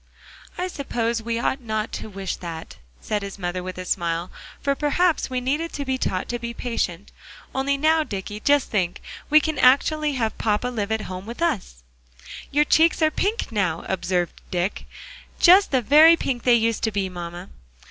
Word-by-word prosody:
"I 360 +1 -1
suppose 235 -8 -2
we 230 +1 -2
ought 265 +3 -1
not 220 -2 -3
to - - -6
wish 195 -2 -4
that," 165 -2 -8 0.2
said 210 -1 -2
his 200 0 -7
mother 180 -1 -3
with 185 0 -7
a 185 - -5
smile, 170 -1 -2 0.3
"for 280 - +1
perhaps 315 +4 +1
we 255 -1 -1
needed 295 +7 -1
to 285 - -4
be 260 -1 -1
taught 185 -5 -1
to 240 - -2
be 235 0 -5
patient. 205 -7 -3 0.4
Only 275 +1 0
now, 315 +2 +3
Dicky, 205 -4 -6
just 285 +4 +2
think, 180 -5 0 0.3
we 305 +1 +7
can 310 -2 -2
actually 295 +4 +4
have 230 -4 -1
papa 215 +3 0
live 220 -4 -3
at 220 0 0
home 185 +1 -7
with 235 - -7
us!" 200 - -2 0.7
"Your 295 +1 +3
cheeks 325 +2 +3
are 310 - +4
pink 410 - -1
now," 185 -6 -1
observed 175 -2 -2
Dick; 180 +2 -2 0.5
"just 380 +3 +7
the 260 -3 +1
very 310 +7 +7
pink 245 -6 -3
they 245 -1 +6
used 230 -1 +1
to 220 - 0
be, 200 -2 -1
mamma." 175 0 -7
230 Hz, 185 wpm, -23 LUFS, 190-285 Hz, 0.7 s, we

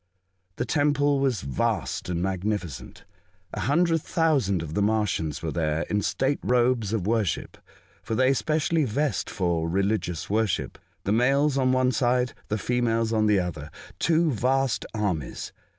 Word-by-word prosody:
The - - -2
Temple 145 -1 +2
was 130 -8 +1
vast 70 +5 -2
and 85 -1 -1
magnificent. 95 -8 -3 0.5
A - - -4
hundred 165 +3 +2
thousand 140 - +1
of 80 -1 -7
the 100 - 0
Martians 100 -8 0
were 80 - -2
there 80 -1 0
in 105 0 +1
state 135 +7 0
robes 120 -4 +2
of 110 -5 -1
worship 110 -4 -1 0.5
(for 110 - -3
they 130 +3 +4
specially 155 +3 +1
vest 140 +4 -1
for 85 -3 -1
religious 95 -2 -1
worship), 105 -2 -1 0.2
the 100 - -1
males 135 +5 +3
on 130 -2 +2
one 130 0 +3
side, 125 -1 +1
the 110 - -1
females 115 0 0
on 110 -1 +2
the 105 -2 +4
other 80 -5 -4 0.2
— - - -22
two 165 0 +2
vast 130 -1 0
armies. 90 - -3
110 Hz, 150 wpm, -26 LUFS, 95-135 Hz, 0.5 s, they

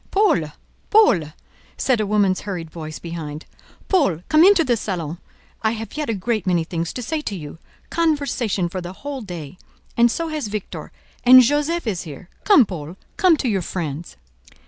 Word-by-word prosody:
"Paul, 340 - +2 0.4
Paul!" 425 - +5 0.5
said 250 -5 +1
a 210 - -1
woman's 200 -3 +2
hurried 175 -6 -5
voice 155 -1 -7
behind, 160 -3 -7 0.4
"Paul, 275 - +2
come 310 +1 +6
into 380 -2 +6
the 245 -5 +2
salon; 175 -6 -4 0.4
I 220 0 +1
have 225 -2 -7
yet 300 -3 -3
a 225 - 0
great 210 0 -2
many 175 -2 +2
things 165 0 -3
to 250 - -5
say 310 +6 -2
to 210 - -4
you—conversation 235 - -2
for 185 +2 -5
the 175 +1 -7
whole 280 +5 -6
day—and 185 +6 -3
so 330 +7 -2
has 305 -6 -3
Victor; 205 -1 -6 0.3
and 255 +1 +9
Josef 295 +6 0
is 195 -6 -2
here. 165 +2 -10 0.2
Come 390 - +7
Paul, 170 -2 -7 0.2
come 365 -5 +4
to 265 - -2
your 200 -5 +1
friends." 165 -2 -5
210 Hz, 170 wpm, -21 LUFS, 170-285 Hz, 0.5 s, and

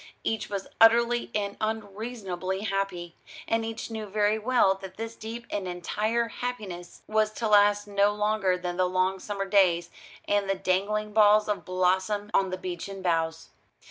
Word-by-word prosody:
Each 225 - -2
was 200 -2 -4
utterly 235 +1 +5
and 200 -1 -2
unreasonably 205 -3 -3
happy, 195 -5 -2 0.3
and 225 0 +1
each 225 +1 -5
knew 220 -1 -5
very 210 +1 +1
well 230 -4 +3
that 190 -1 -9
this 225 +1 -5
deep 230 +2 -7
and 200 -2 -2
entire 210 +6 -1
happiness 210 -10 -6
was 215 0 +1
to 225 0 -2
last 205 0 +4
no 200 0 +2
longer 210 -3 +1
than 180 -1 -4
the 185 -1 +2
long 185 +1 +1
summer 200 +1 -4
days 180 -4 +3 0.4
and 205 -1 +1
the 195 - +2
dangling 205 +3 -1
balls 210 0 +5
of 210 -1 -2
blossom 190 +3 0
on 190 -1 +3
the 185 - -3
beechen 185 +2 -6
boughs. 165 -2 -1
205 Hz, 160 wpm, -27 LUFS, 185-215 Hz, 0.4 s, utterly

